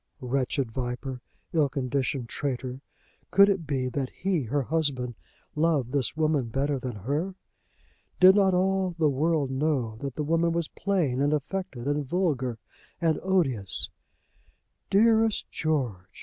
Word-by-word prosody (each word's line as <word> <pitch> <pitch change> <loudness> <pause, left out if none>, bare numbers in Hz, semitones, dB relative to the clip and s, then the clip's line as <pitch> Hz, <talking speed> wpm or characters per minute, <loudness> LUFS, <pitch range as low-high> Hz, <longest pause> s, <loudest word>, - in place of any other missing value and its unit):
Wretched 130 -1 -1
viper; 125 +1 -4 0.3
ill 155 -4 +3
conditioned 135 -2 -2
traitor! 130 0 -3 0.5
Could 200 +1 +6
it 185 -6 -1
be 130 -3 0
that 130 0 -2
he, 185 -4 -1
her 140 +5 0
husband, 135 -5 -1 0.4
loved 150 -6 +1
this 140 +1 0
woman 155 -5 +1
better 140 +3 0
than 125 -2 -5
her? 145 - -2 0.8
Did 185 +1 +9
not 195 -2 +4
all 190 -1 +1
the 155 -3 +3
world 150 0 +1
know 130 -5 0
that 135 +1 -5
the 150 - -2
woman 165 +2 +2
was 170 -2 0
plain 165 -10 0
and 145 +1 +2
affected, 150 -4 -4
and 145 +1 0
vulgar, 140 -6 0 0.4
and 160 -2 +1
odious? 135 - 0 1.0
"Dearest 220 +1 +3
George!" 125 - -1
145 Hz, 135 wpm, -27 LUFS, 130-170 Hz, 1.0 s, Did